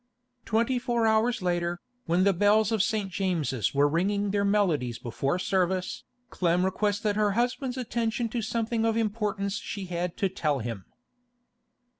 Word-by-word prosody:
Twenty 230 +3 +1
four 240 -2 0
hours 220 0 +2
later, 175 -1 0 0.3
when 175 +3 +3
the 200 0 +4
bells 210 +3 +3
of 220 -3 +2
St. 205 -2 -1
James's 165 - -1
were 145 +1 +5
ringing 200 +6 0
their 200 0 +1
melodies 175 - +1
before 125 +6 -2
service, 185 0 -1 0.3
Clem 180 0 +1
requested 205 +2 0
her 210 -1 +2
husband's 250 +3 -1
attention 235 -1 -1
to 235 +1 -2
something 225 +1 -1
of 225 0 +1
importance 210 -2 -1
she 200 -2 -5
had 175 -1 -3
to 195 - +2
tell 155 -6 -1
him. 115 -6 -5
200 Hz, 150 wpm, -27 LUFS, 175-220 Hz, 0.3 s, were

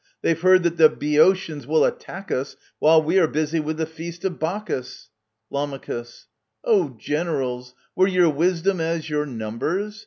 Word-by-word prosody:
They've 165 0 +1
heard 185 0 +5
that 170 0 0
the 155 -1 +7
Boeotians 150 -1 +1
will 160 +1 +3
attack 195 +2 -5
us 135 +2 -2 0.2
While 160 +1 +5
we 170 +5 +2
are 165 - +4
busy 155 +1 -1
with 155 +1 -3
the 160 - -1
feast 165 +2 -9
of 180 -3 -2
Bacchus. 160 - -4 0.4
Lam. 140 -1 -3 0.8
Oh, 180 - +1
generals, 130 -4 -3 0.2
were 185 - +4
your 180 -4 +3
wisdom 175 +4 0
as 160 -1 -2
your 150 0 -1
numbers 145 - -4
160 Hz, 155 wpm, -23 LUFS, 150-180 Hz, 0.8 s, the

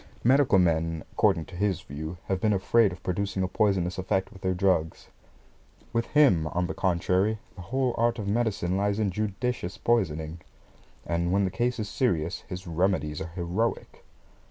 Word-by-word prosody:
Medical 130 -3 +5
men, 80 -2 +1
according 80 - +2
to 90 - -12
his 100 -1 0
view, 80 +5 -7
have 95 -1 -1
been 105 -1 +3
afraid 100 +2 +3
of 90 - -10
producing 95 +1 -1
a - - +1
poisonous 95 -2 +1
effect 95 +1 -1
with 95 - -14
their 95 0 0
drugs. 90 -4 0 0.8
With 115 0 0
him, 130 - +4
on 90 +3 -1
the 95 - -3
contrary, 95 +3 +1 0.2
the 95 - -10
whole 130 +6 0
art 120 0 +2
of 105 -3 -4
medicine 105 -4 0
lies 100 +1 +1
in 105 -3 0
judicious 105 0 -3
poisoning, 80 -8 0 0.7
and 85 +1 0
when 100 +1 +3
the 95 - -2
case 125 +3 0
is 110 -2 -3
serious, 85 - 0
his 90 0 -7
remedies 85 -3 0
are 85 - -5
heroic. 90 +6 -2
95 Hz, 170 wpm, -27 LUFS, 85-110 Hz, 0.8 s, Medical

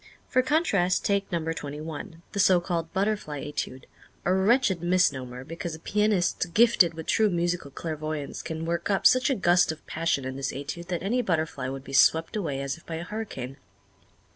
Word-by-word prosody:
For 255 - +3
contrast 250 - +1
take 200 -1 0
number 165 -2 -1
twenty 145 -2 -6
one, 160 +2 -7
the 200 - -4
so 185 -2 +5
called 170 -2 -3
"Butterfly 195 -8 -1
Étude" 130 -3 -4 0.4
a 180 - +3
wretched 190 -1 +3
misnomer, 130 -9 +1
because 165 +2 -5
a - - -12
pianist 195 -3 0
gifted 225 -7 +5
with 160 -1 -7
true 220 -1 +3
musical 175 -3 -1
clairvoyance 155 0 -4
can 160 0 -5
work 170 +3 -2
up 195 -1 +1
such 255 +2 +6
a 270 - +2
gust 175 -4 +3
of 160 - -10
passion 160 -4 -1
in 130 0 -4
this 135 0 -2
Étude 145 +5 -6
that 175 -2 -3
any 240 +6 +1
butterfly 160 - -1
would 135 0 -6
be 135 - -10
swept 160 +6 +4
away 150 -10 -2
as 140 +3 -3
if 170 - -20
by 165 - -4
a 165 - -4
hurricane. 175 - -6
170 Hz, 190 wpm, -27 LUFS, 150-190 Hz, 0.4 s, such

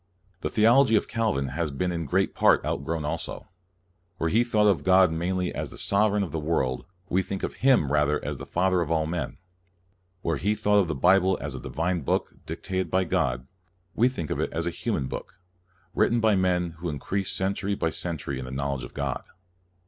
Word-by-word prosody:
The - - -2
theology 115 +3 +5
of - - +2
Calvin 105 - 0
has 80 +4 -2
been 90 +6 -2
in 85 -3 -3
great - - +1
part - - +4
outgrown 80 -2 -2
also. 75 - -5 0.7
Where 80 -2 -1
he 115 +2 +4
thought 110 -3 +2
of 100 -2 +3
God 95 -2 +5
mainly 90 +2 -1
as - - -4
the - - -11
Sovereign 105 0 +2
of 95 - -5
the 80 - -2
world, 75 -5 -1 0.2
we 95 0 +2
think 95 +1 -5
of - - -3
Him 125 - +4
rather 75 0 +2
as - - -4
the - - -8
Father 90 0 +1
of 80 - -2
all 80 -1 +1
men. 80 -4 -3 0.9
Where 85 - 0
he 105 +2 0
thought 105 -1 +3
of 95 - +2
the 80 - -2
Bible 95 +5 +4
as - - -5
a - - -6
divine 85 +2 -2
book, 65 - -1
dictated 95 0 -3
by 95 0 +2
God, 60 -7 0 0.5
we 120 +3 +3
think 85 - -5
of - - -1
it - - -1
as 85 +1 -2
a 85 - -1
human 85 - -2
book, 90 - -7 0.5
writ - - +3
ten 120 - +1
by 110 -2 +3
men 90 -2 +1
who 85 0 -3
increased 95 +7 -2
century 100 +1 -1
by 80 -4 -1
cen 85 0 -4
tury 70 -1 -4
in 65 - -5
the - - -7
knowledge 65 0 -3
of 60 - -10
God. 70 -3 -2
90 Hz, 210 wpm, -26 LUFS, 75-100 Hz, 0.9 s, theology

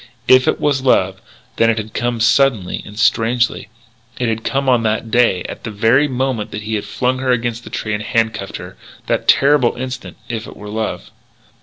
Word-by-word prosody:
If 130 0 +6
it - - +1
was 140 -3 +1
love, 95 -7 +2 0.4
then 115 - +4
it 115 - +1
had 110 0 -5
come 120 -1 -1
suddenly, 115 -4 +2
and 105 - -11
strangely. 115 0 +1 0.5
It 125 -2 0
had 115 0 -2
come 135 0 -1
on 125 -2 +4
that 110 0 -1
day 120 -7 +3
at - - -8
the 115 - -4
very 115 +7 +3
moment 130 -4 -2
when 105 - -5
he 110 -1 -2
flung 130 +4 -1
her 130 0 -2
against 120 -1 -1
the - - -10
tree 110 - -3
and 105 - -2
handcuffed 110 -3 -1
her - - -10 0.3
that - - -1
terrible 140 -3 +4
instant 130 +1 -6
if 115 -2 -5
it - - -11
were 105 0 -9
love. 110 +1 -4
115 Hz, 195 wpm, -18 LUFS, 110-130 Hz, 0.5 s, If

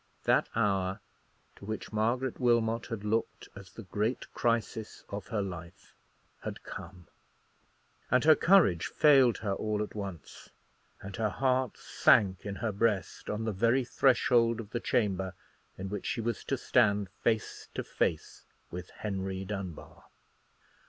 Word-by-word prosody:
That - - +3
hour, 95 -4 +1 0.6
to - - -12
which 110 0 -5
Margaret 120 +4 0
Wilmot 115 -2 +2
had 115 -3 -5
looked 110 +2 -2
as 100 -1 -11
the 115 - -10
great 105 +5 -2
crisis 115 -2 -1
of 100 0 -6
her 110 -4 -1
life, 90 -1 -9 0.5
had - - -6
come; 90 -2 -9 1.0
and 125 +1 +3
her 155 0 +8
courage 165 - +4
failed 135 -6 +5
her 100 - +1
all 105 +1 -1
at - - -8
once, 100 -7 -8 0.5
and 95 0 -7
her 110 -1 +1
heart 130 +4 0
sank 95 -2 +3
in 100 - -4
her 110 +2 -2
breast 105 -1 -1
on 105 +1 -2
the 110 - 0
very 115 +6 +2
threshold 120 -3 +3
of 110 -2 -8
the 120 - -1
chamber 95 -6 0 0.4
in 95 - -5
which 100 0 -4
she - - -1
was 115 +1 -2
to 135 - -1
stand 105 -5 +2
face 110 -2 -1
to - - -2
face 80 - -2 0.3
with 90 +1 -7
Henry 95 -2 -4
Dunbar. 95 -4 -7
105 Hz, 145 wpm, -30 LUFS, 95-115 Hz, 1.0 s, her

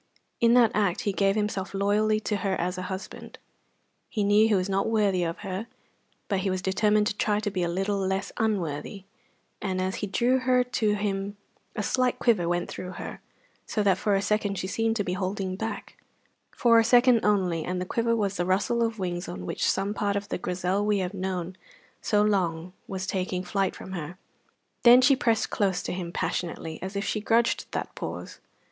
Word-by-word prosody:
In 235 0 +5
that 235 -3 +6
act 200 -4 +1
he 200 - -1
gave 195 0 +2
himself 205 -2 -2
loyally 210 +2 +2
to 210 -1 -1
her 195 -1 -1
as 180 +2 -1
a 185 - -4
husband. 190 0 -7 0.7
He 210 - -1
knew 205 +2 +5
he 215 - +3
was 185 -1 0
not 195 +2 0
worthy 205 -5 +2
of 165 0 -2
her, 195 +4 -4 0.6
but 200 -3 0
he 195 +1 -1
was 185 0 -2
determined 210 +2 +2
to 205 - -1
try 210 -1 +1
to 210 -1 -2
be 185 -2 -2
a 175 - +1
little 195 +3 -1
less 190 +1 -1
unworthy; 195 -4 -2 0.6
and 190 -2 -2
as 185 +1 -1
he 205 - -3
drew 245 +6 +2
her 250 0 +3
to 225 -4 0
him 200 0 -2 0.4
a 210 - -2
slight 255 +3 +1
quiver 195 -8 +2
went 175 0 0
through 185 0 -7
her, - - -7 0.5
so 210 - 0
that 190 -2 +3
for 205 -2 +2
a 195 - +1
second 205 -1 0
she - - -3
seemed 225 +3 0
to 210 - 0
be 180 - -2
holding 185 0 -2
back 220 +3 -5 0.5
for 230 -1 +4
a - - +4
second 240 0 +5
only, 185 -6 +1
and 180 +2 -2
the 180 - -2
quiver 230 +4 0
was 200 -3 -1
the 175 - 0
rustle 205 +6 +1
of 225 -1 0
wings 175 -2 -3
on 90 0 -6
which - - 0
some 195 +2 0
part 205 -1 -1
of 200 0 -3
the - - -2
Grizel 180 +3 -1
we 210 0 +2
have 185 0 -2
known 185 -2 -3 0.5
so 210 -1 +2
long 180 -4 0
was 190 -1 -4
taking 185 -1 -2
flight 195 0 -1
from 190 - -9
her. 175 -1 -6 0.6
Then 245 +1 +8
she 275 +2 +5
pressed 230 -4 +1
close 195 -3 0
to - - -3
him 180 -2 -4
passionately, 165 -2 -3
as 190 +2 -6
if 200 - -2
she 215 - -1
grudged 230 +2 +2
that - - -4
pause. - - -6
200 Hz, 205 wpm, -27 LUFS, 185-215 Hz, 0.7 s, Then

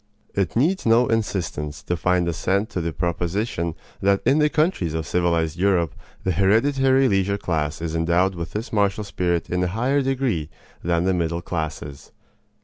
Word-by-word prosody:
It 95 -4 -1
needs 165 +11 +2
no 115 +2 +5
insistence 90 -9 -2
to 90 - -1
find 90 +1 +1
assent 100 +5 0
to 90 - -2
the 85 0 -2
proposition 85 - -2 0.3
that 100 0 +3
in 145 - +4
the 150 0 +4
countries 150 - 0
of 80 -1 -2
civilized 85 -1 0
Europe 90 -6 +2 0.3
the 95 - +1
hereditary 130 - +3
leisure 100 -2 +1
class 80 -4 -2
is 80 -1 -3
endowed 85 +3 +2
with 85 -2 -6
this 110 +3 -5
martial 100 0 +1
spirit 90 -4 -1
in 90 +1 0
a - - +1
higher 125 +9 +1
degree 130 - -1 0.3
than 85 0 +1
the 95 +1 +2
middle 85 -1 -1
classes. 75 -5 -5
90 Hz, 165 wpm, -23 LUFS, 85-110 Hz, 0.3 s, no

